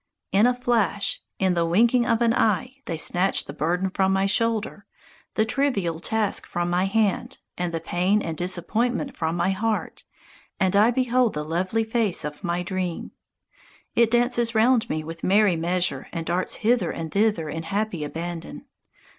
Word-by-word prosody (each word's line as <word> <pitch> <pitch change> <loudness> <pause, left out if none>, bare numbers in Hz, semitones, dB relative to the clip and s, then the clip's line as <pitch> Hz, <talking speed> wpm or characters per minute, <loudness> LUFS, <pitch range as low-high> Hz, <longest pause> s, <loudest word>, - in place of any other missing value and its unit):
In 205 +5 +5
a 250 - +3
flash, 235 -5 0 0.2
in 190 -1 +2
the 170 -1 +1
winking 235 +8 +3
of 230 -1 +2
an 230 -1 +3
eye 250 +4 +1
they 165 - -3
snatch 180 +4 +2
the - - -8
burden 180 +4 -1
from 190 0 +1
my 195 0 +2
shoulder, 210 0 -1 0.5
the 220 - +2
trivial 215 - 0
task 215 +3 -1
from 175 0 -2
my 180 +2 +2
hand 210 0 0 0.2
and 180 -1 -2
the 165 - -2
pain 180 +5 +1
and 165 -5 -4
disappointment 220 - -1
from 160 -1 -2
my 175 +2 +1
heart, 215 +3 -2 0.5
and 190 -1 +1
I 210 +3 +6
behold 250 -2 +1
the 150 0 -3
lovely 185 +8 0
face 220 -6 +1
of 150 +4 -7
my 175 0 -1
dream. 180 -1 -4 0.8
It 235 -1 +4
dances 240 -1 +1
round 235 +1 +3
me 155 - -2
with 165 +1 -9
merry 200 -1 +4
measure 170 -4 -1
and 165 -1 -4
darts 175 +3 0
hither 220 -5 +1
and 160 -1 -5
thither 205 -6 +1
in 160 +2 -4
happy 195 0 -2
abandon. 165 +2 -6
195 Hz, 170 wpm, -24 LUFS, 175-225 Hz, 0.8 s, I